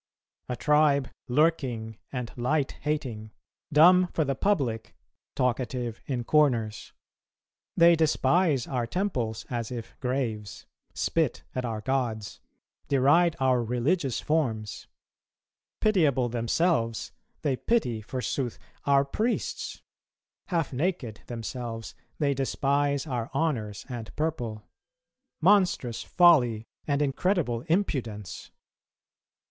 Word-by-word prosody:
A 125 - -1
tribe 145 -1 +3 0.2
lurking 125 -6 0
and 125 -3 -5
light 135 +4 0
hating, 130 -8 -3 0.4
dumb 180 +5 +7
for 160 - +2
the 135 - 0
public, 135 - -1 0.4
talkative 125 -2 -1
in 125 -3 -2
corners, 120 -7 +1 0.9
they 170 0 +7
despise 155 -2 +2
our 125 -3 -2
temples 120 - -2
as 120 -2 -2
if 120 -2 -7
graves, 115 -6 -3 0.3
spit - - 0
at 130 -1 -2
our 110 -2 -3
gods, 115 -5 -2 0.5
deride 145 +5 +4
our 130 -2 +3
religious 125 +4 0
forms; 115 -9 -1 0.9
pitiable 150 - +3
themselves, 115 - 0 0.3
they 140 -3 +1
pity, 125 - 0
forsooth, 125 +2 -3 0.3
our 140 0 +4
priests; 220 - -2 0.6
half 165 -6 -1
naked 135 - -2
themselves, 115 -1 -5 0.2
they 140 -2 +1
despise 140 +1 0
our 120 -6 -3
honours 115 -10 -1
and 120 -4 -7
purple; 120 -9 -2 0.8
monstrous 180 - +3
folly 125 -11 +4 0.2
and 145 0 +2
incredible 140 - 0
impudence! 120 - -2
130 Hz, 100 wpm, -27 LUFS, 115-155 Hz, 0.9 s, dumb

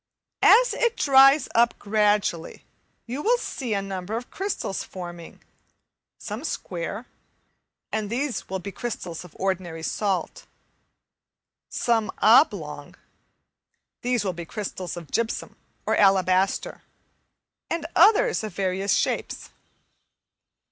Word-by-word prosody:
As - - +6
it 475 -1 0
dries 275 0 +6
up 235 +1 +3
gradually, 205 -5 0 0.4
you 255 +5 -4
will 480 +7 +3
see 250 - -4
a 195 - -1
number 195 +2 -4
of 245 - -8
crystals 385 - -3
forming, 175 -2 -9 0.7
some 220 +5 -6
square 200 - -4 0.9
and 215 -2 -2
these 255 +3 -3
will 190 - -2
be 200 +2 -7
crystals 180 -6 -5
of 180 - -15
ordinary 180 -4 -2
salt; 195 +1 -2 1.2
some 230 -3 0
oblong 230 +8 +3 1.1
these 245 -3 0
will 185 - -1
be 170 0 -7
crystals 185 -1 -6
of 170 -3 -10
gypsum 230 -1 -2 0.3
or - - +1
alabaster; 190 -1 +2 0.9
and 335 -2 -2
others 440 - +5
of 215 - -6
various 195 +1 0
shapes. - - -2
210 Hz, 110 wpm, -25 LUFS, 185-250 Hz, 1.2 s, As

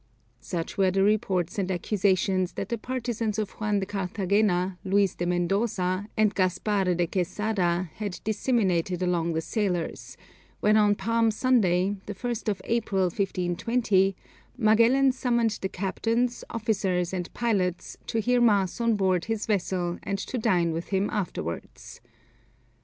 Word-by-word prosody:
Such 170 +1 -5
were 190 -1 +4
the 195 +1 +2
reports 200 -2 +1
and 190 -1 -1
accusations 185 0 +1
that 195 - -5
the 235 - -1
partisans 230 -3 -2
of 215 -2 -2
Juan 210 -1 -1
de - - -1
Carthagena, 190 -1 0
Luis 195 -1 +2
de 175 - -3
Mendoza, 185 +1 0
and 215 -1 +3
Gaspar 190 +2 0
de 175 -1 +1
Quesada 185 0 -1
had 205 -4 -4
disseminated 190 -6 0
among 170 -2 0
the 160 - 0
sailors, 180 -3 -3 0.4
when 210 +1 +3
on 210 -1 +4
Palm 230 +1 +1
Sunday, 205 -5 +2
the 205 - -5
1st 235 +1 -3
of 200 - -3
April, 215 -5 0
1520, 195 +2 +1 0.4
Magellan 235 +4 +4
summoned 235 -3 0
the 190 - -2
captains, 230 +6 -1
officers, 195 -6 -1
and 180 -2 -3
pilots, 190 -7 -1
to 225 - -1
hear 245 +2 +2
mass 205 -3 +2
on 230 -1 +2
board 185 -3 +1
his 225 -1 -2
vessel 180 -4 -1
and 200 - -2
to 245 +5 -4
dine 180 -7 +2
with 165 +1 -4
him 195 +1 0
afterwards. 120 - -5
200 Hz, 140 wpm, -26 LUFS, 180-220 Hz, 0.4 s, were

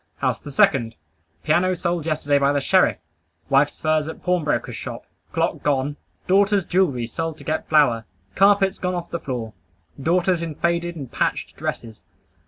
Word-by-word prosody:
House - - 0
the 145 - -9
second. 120 -4 +3 0.5
Piano 180 +4 +2
sold 170 -2 -2
yesterday 145 -2 +1
by 140 0 +3
the 145 - +2
sheriff. 185 +7 +3 0.5
Wife's 140 +2 +2
furs 155 -1 +1
at 160 - -8
pawnbroker's 175 -5 0
shop. - - -7 0.3
Clock - - -1
gone. 145 0 0 0.3
Daughter's 200 0 +3
jewelry 155 -10 +1
sold 160 +6 -4
to - - -13
get 155 0 -3
flour. 120 -8 +3 0.3
Carpets 195 0 +3
gone 180 0 -1
off 175 -1 -5
the 170 - -2
floor. 120 -7 -5 0.5
Daughters 175 +3 +2
in 165 -3 -4
faded 170 +1 -1
and 140 -6 -8
patched - - -2
dresses. 110 -2 -5
160 Hz, 160 wpm, -22 LUFS, 140-180 Hz, 0.5 s, second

